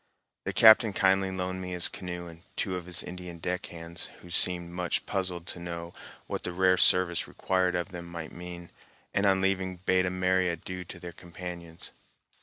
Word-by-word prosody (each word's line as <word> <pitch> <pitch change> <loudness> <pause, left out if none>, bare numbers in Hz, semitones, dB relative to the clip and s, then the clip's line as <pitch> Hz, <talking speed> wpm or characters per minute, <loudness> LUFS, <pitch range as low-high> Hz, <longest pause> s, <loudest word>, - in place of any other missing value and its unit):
The - - 0
captain 110 -1 +8
kindly 95 -1 +3
loaned 95 0 -3
me 90 0 -5
his 90 -1 +3
canoe 90 -1 -6
and 85 -1 -11
two 95 - -1
of 90 -1 -6
his 85 -2 -4
Indian 90 -1 -7
deck 90 +2 -3
hands, 85 0 -5
who 85 - -12
seemed 85 0 +2
much 90 0 -1
puzzled 90 -3 -2
to - - -5
know 85 0 -6 0.3
what - - -4
the 90 - -4
rare 95 +1 +4
service 90 -2 +4
required 95 -1 0
of 90 +2 -1
them 85 -2 -7
might 85 -2 -6
mean, 85 0 -8 0.4
and 100 0 +3
on 95 -1 +4
leaving 95 -1 0
bade 90 +1 +2
a - - +2
merry 90 0 +2
adieu 90 +2 -5
to 85 - -9
their 85 0 -8
companions. 85 -1 -8
90 Hz, 190 wpm, -29 LUFS, 85-95 Hz, 0.4 s, captain